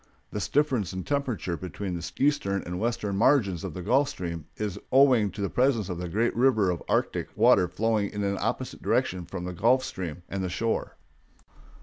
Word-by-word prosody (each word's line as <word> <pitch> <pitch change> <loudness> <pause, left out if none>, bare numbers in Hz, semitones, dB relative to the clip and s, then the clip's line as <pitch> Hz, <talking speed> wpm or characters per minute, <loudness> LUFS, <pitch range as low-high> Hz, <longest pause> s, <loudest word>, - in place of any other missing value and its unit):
This 105 - -3
difference 130 - +1
in 95 0 -4
temperature 130 -11 -1
between 90 +2 -5
the 85 0 -5
eastern 135 -9 +1
and 90 +1 -5
western 110 -3 -1
margins 105 - +3
of 95 -5 -5
the 90 - -5
Gulf 135 +8 +3
Stream 85 -3 -5
is 105 -2 -3
owing 130 -6 +5
to 100 - -7
the 100 - +1
presence 125 -6 +2
of 90 -2 -4
the 90 -1 -4
great 110 +7 0
river 115 -6 +3
of 85 - -4
Arctic - - 0
water 90 - +5
flowing 105 +2 0
in 105 0 -4
an 100 -1 -1
opposite - - -3
direction 90 -1 0
between 90 0 -6
the 90 0 -4
Gulf 120 +8 +3
Stream 90 -2 -5
and 95 -1 -3
the 90 - -2
shore. 115 +5 -2
100 Hz, 195 wpm, -27 LUFS, 90-120 Hz, -, owing